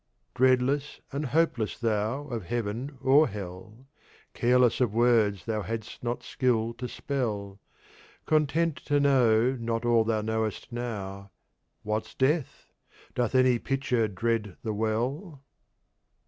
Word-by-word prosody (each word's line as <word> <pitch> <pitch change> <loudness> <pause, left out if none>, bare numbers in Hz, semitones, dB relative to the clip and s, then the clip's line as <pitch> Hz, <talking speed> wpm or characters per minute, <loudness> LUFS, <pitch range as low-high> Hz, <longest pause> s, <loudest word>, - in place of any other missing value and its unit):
Dreadless 130 +3 +2
and 145 +1 -2
hopeless 125 -6 +1
thou 115 +4 -1
of 120 -9 -5
Heaven 120 +6 -3
or 140 +4 +5
Hell, 100 +5 -9 0.5
Careless 125 +1 +3
of 115 -4 +1
Words 115 -5 +3
thou 110 -2 -1
hadst 110 +2 -6
not 120 0 -2
Skill 115 -4 0
to 125 - -3
spell, 105 -9 -3 0.7
Content 155 +1 +1
to 145 0 +2
know 125 -4 +4
not 115 -2 -3
all 120 -1 +4
thou 110 -1 0
knowest 110 +1 -2
now, 100 -5 -5 0.5
What's 110 +1 -3
Death? 145 +2 0 0.5
Doth 125 +1 -1
any 130 -2 +4
Pitcher 130 -4 0
dread 105 0 -2
the 110 - -2
Well? 130 - -2
120 Hz, 120 wpm, -28 LUFS, 110-130 Hz, 0.7 s, or